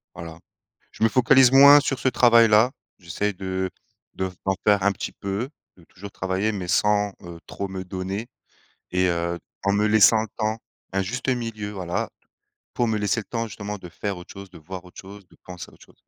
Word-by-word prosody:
Voilà, 80 Hz, -1 st, -9 dB, 0.5 s
je -, -, -2 dB
me -, -, +5 dB
focalise 130 Hz, +1 st, +5 dB
moins 140 Hz, +2 st, +9 dB
sur 135 Hz, -2 st, -2 dB
ce 130 Hz, -, +1 dB
travail-là, 115 Hz, -2 st, +5 dB, 0.3 s
j'essaie 95 Hz, +4 st, -3 dB
de 95 Hz, 0 st, -3 dB, 0.4 s
de 95 Hz, 0 st, -3 dB, 0.2 s
d'en 95 Hz, -, +2 dB
faire 105 Hz, -2 st, +3 dB
un 100 Hz, -, +3 dB
petit 95 Hz, -, -6 dB
peu, 100 Hz, +6 st, -4 dB, 0.3 s
de 90 Hz, -, -19 dB
toujours 100 Hz, +4 st, -12 dB
travailler, 95 Hz, +3 st, -2 dB
mais 95 Hz, -4 st, -5 dB
sans, 105 Hz, +2 st, +2 dB
heu, 85 Hz, -2 st, -10 dB
trop 100 Hz, -, -5 dB
me 95 Hz, -1 st, -6 dB
donner 95 Hz, +4 st, -5 dB, 0.7 s
et 90 Hz, 0 st, +2 dB
heu, 85 Hz, 0 st, -1 dB, 0.3 s
en 100 Hz, -, +2 dB
me 105 Hz, +1 st, +2 dB
laissant 110 Hz, +1 st, +5 dB
le 110 Hz, -, -4 dB
temps, 110 Hz, 0 st, -1 dB, 0.4 s
un 95 Hz, -, +1 dB
juste 120 Hz, +8 st, -4 dB
milieu, 115 Hz, -4 st, -3 dB
voilà, 90 Hz, -4 st, -3 dB, 0.7 s
pour 120 Hz, -, +1 dB
me 110 Hz, -, 0 dB
laisser 105 Hz, +2 st, 0 dB
le -, -, -15 dB
temps, 115 Hz, -1 st, -3 dB
justement, 105 Hz, 0 st, -6 dB
de 90 Hz, -, -10 dB
faire 100 Hz, +3 st, -5 dB
autre 90 Hz, -, -12 dB
chose, 100 Hz, -1 st, -10 dB
de -, -, -13 dB
voir 90 Hz, +3 st, -9 dB
autre 90 Hz, -, -14 dB
chose, 100 Hz, 0 st, -13 dB
de -, -, -22 dB
penser 90 Hz, -1 st, -9 dB
à -, -, -23 dB
autre -, -, -18 dB
chose. -, -, -23 dB
100 Hz, 205 wpm, -23 LUFS, 95-110 Hz, 0.7 s, moins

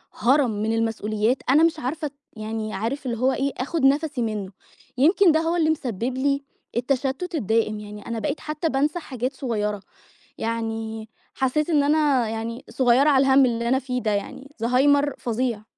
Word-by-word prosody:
هَرَم 255 Hz, +1 st, +3 dB
من 220 Hz, +1 st, 0 dB
المسئوليات 225 Hz, +1 st, 0 dB
أنا 300 Hz, +4 st, +5 dB
مش 330 Hz, -1 st, +2 dB
عارفة 300 Hz, +3 st, -3 dB, 0.3 s
يعني 215 Hz, 0 st, -4 dB
عارف 230 Hz, +8 st, -3 dB
اللي 235 Hz, -2 st, -2 dB
هو 260 Hz, +3 st, +2 dB
إيه 275 Hz, +1 st, -1 dB
أخد 275 Hz, +2 st, -1 dB
نفسي 285 Hz, -1 st, +2 dB
منه، 210 Hz, -4 st, -3 dB, 0.5 s
يمكن 340 Hz, +6 st, +5 dB
ده 315 Hz, -, +3 dB
هو 330 Hz, +1 st, 0 dB
اللي 320 Hz, -2 st, +2 dB
مسبب 250 Hz, -4 st, -2 dB
لي 280 Hz, +1 st, 0 dB, 0.3 s
التشتت 275 Hz, +7 st, -1 dB
الدائم، 220 Hz, -3 st, 0 dB
يعني 210 Hz, 0 st, -10 dB
أنا 230 Hz, -1 st, -3 dB
بقيت 290 Hz, +5 st, -2 dB
حتى 305 Hz, +1 st, -2 dB
بانسى 295 Hz, +5 st, 0 dB
حاجات 255 Hz, -3 st, -4 dB
صغيرة، 210 Hz, -6 st, -2 dB, 0.6 s
يعني 225 Hz, -1 st, -3 dB, 0.3 s
حسيت 295 Hz, +5 st, 0 dB
إن 295 Hz, -3 st, +4 dB
أنا 285 Hz, -5 st, +2 dB
يعني 225 Hz, +2 st, -5 dB
صغيرة 255 Hz, +3 st, +3 dB
على 270 Hz, -1 st, +4 dB
الهَمّ 265 Hz, 0 st, +6 dB
اللي 235 Hz, 0 st, -1 dB
أنا 260 Hz, -, +3 dB
فيه 250 Hz, -1 st, -3 dB
ده 215 Hz, -, 0 dB
يعني، 210 Hz, +7 st, -4 dB
زهايمر 280 Hz, +4 st, +3 dB
فظيع. 235 Hz, -2 st, -2 dB
255 Hz, 165 wpm, -24 LUFS, 225-285 Hz, 0.6 s, الهَمّ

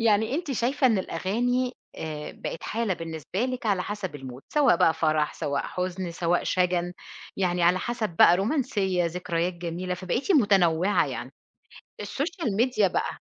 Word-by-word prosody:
يعني 220 Hz, +2 st, +3 dB
أنتِ 330 Hz, -2 st, -2 dB
شايفة 260 Hz, +2 st, +1 dB
إن 225 Hz, -6 st, +3 dB
الأغاني، 245 Hz, +9 st, -1 dB, 0.2 s
آآ، 150 Hz, -1 st, -5 dB
بقت -, -, -6 dB
حالة 220 Hz, -3 st, -1 dB
بالنسبة 165 Hz, +3 st, -5 dB
لِك 255 Hz, -2 st, -3 dB
على 195 Hz, -4 st, +2 dB
حسب 205 Hz, -4 st, -5 dB
المود، 130 Hz, -1 st, -9 dB
سواء 290 Hz, -, +5 dB
بقى 165 Hz, -, +4 dB
فرَح، 155 Hz, -1 st, +1 dB
سواء 140 Hz, -1 st, -2 dB
حُزن، 185 Hz, 0 st, -3 dB
سواء 170 Hz, +1 st, 0 dB
شَجَن، 180 Hz, -1 st, +1 dB, 0.4 s
يعني 180 Hz, -2 st, 0 dB
على 180 Hz, +2 st, +4 dB
حسب 235 Hz, -1 st, -2 dB
بقى، 175 Hz, -, +8 dB
رومانسية، 200 Hz, -, 0 dB
ذكريات 175 Hz, 0 st, -1 dB
جميلة، 175 Hz, +1 st, -4 dB
فبقيتِ 185 Hz, -, -1 dB
متنوِّعة، 195 Hz, -, +3 dB
يعني -, -, -6 dB, 0.7 s
السوشيال 290 Hz, -, -2 dB
ميديا 230 Hz, -3 st, +3 dB
بقى -, -, -2 dB
185 Hz, 150 wpm, -26 LUFS, 170-235 Hz, 0.7 s, بقى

